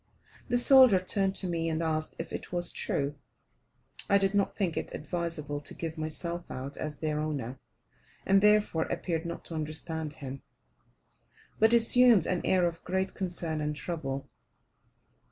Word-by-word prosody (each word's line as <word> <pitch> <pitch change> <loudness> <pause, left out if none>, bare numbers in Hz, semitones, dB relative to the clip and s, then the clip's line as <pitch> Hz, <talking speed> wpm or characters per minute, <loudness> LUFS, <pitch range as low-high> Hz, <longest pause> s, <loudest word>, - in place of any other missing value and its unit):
The 245 - +2
soldier 255 -5 +7
turned 195 +1 +2
to 190 - -1
me 165 -1 -1
and 160 0 -1
asked 155 -1 -1
if - - -6
it - - -6
was 175 -1 0
true. 140 0 -2 1.0
I 200 - +6
did 195 0 +1
not 200 -1 +1
think 185 -6 -1
it - - -4
advisable 160 -3 -3
to 145 - -4
give 165 -1 -5
myself 170 +2 -4
out 135 +2 -6
as 150 -1 -5
their 155 -1 -1
owner, 135 -5 -4 0.7
and 195 0 +4
therefore 210 -6 +3
appeared 170 -1 -3
not 170 - -6
to - - -7
understand 155 0 -3
him, 135 -2 -7 1.2
but 220 +1 +5
assumed 235 -4 +6
an 180 -1 0
air 185 -1 +3
of 170 -1 -3
great 190 +1 -1
concern 170 -4 -2
and 150 0 -2
trouble. 140 -4 -4
170 Hz, 155 wpm, -29 LUFS, 155-190 Hz, 1.2 s, soldier